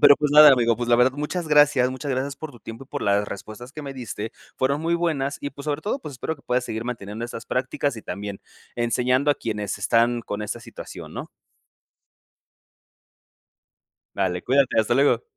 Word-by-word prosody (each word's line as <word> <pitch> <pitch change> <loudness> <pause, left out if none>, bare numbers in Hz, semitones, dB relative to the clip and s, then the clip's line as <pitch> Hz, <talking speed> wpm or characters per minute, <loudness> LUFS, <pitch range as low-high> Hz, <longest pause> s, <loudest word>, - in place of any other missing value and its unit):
Pero, 145 - +8
pues, 150 -1 0
nada, 150 -1 +10
amigo, 120 -3 +3
pues 120 +1 -3
la 120 - +5
verdad 125 +2 +4
muchas 150 +4 -3
gracias, 145 -4 +5
muchas 135 +2 -5
gracias 135 +2 -1
por 155 - -7
tu 120 - -15
tiempo 115 +5 -9
y - - -26
por 145 - -4
las 100 0 +2
respuestas 110 +5 -8
que 155 - -7
me 135 -1 -6
diste. 115 -3 -5 0.2
Fueron 140 +3 +1
muy 170 +1 +1
buenas 150 -5 -1
y, 140 - -4
pues, 140 +1 -11
sobre 150 +1 -1
todo, 220 +7 -1
pues, 150 - -8
espero 160 +5 -4
que 140 - -22
puedas 125 0 0
seguir 110 0 -4
manteniendo 115 -2 -5
esas 120 -1 -7
prácticas 130 0 -1
y 110 - -8
también 100 +1 -6 0.3
enseñando 125 +4 +2
a - - +3
quienes 105 -3 -3
están 120 +1 +2
con 105 0 -4
esta 105 - -4
situación, - - -10
¿no? - - -6 2.9
Vale, 90 -2 0
cuídate. 135 -1 +2
Hasta 110 +2 +2
luego. 140 - +3
125 Hz, 195 wpm, -24 LUFS, 115-145 Hz, 2.9 s, nada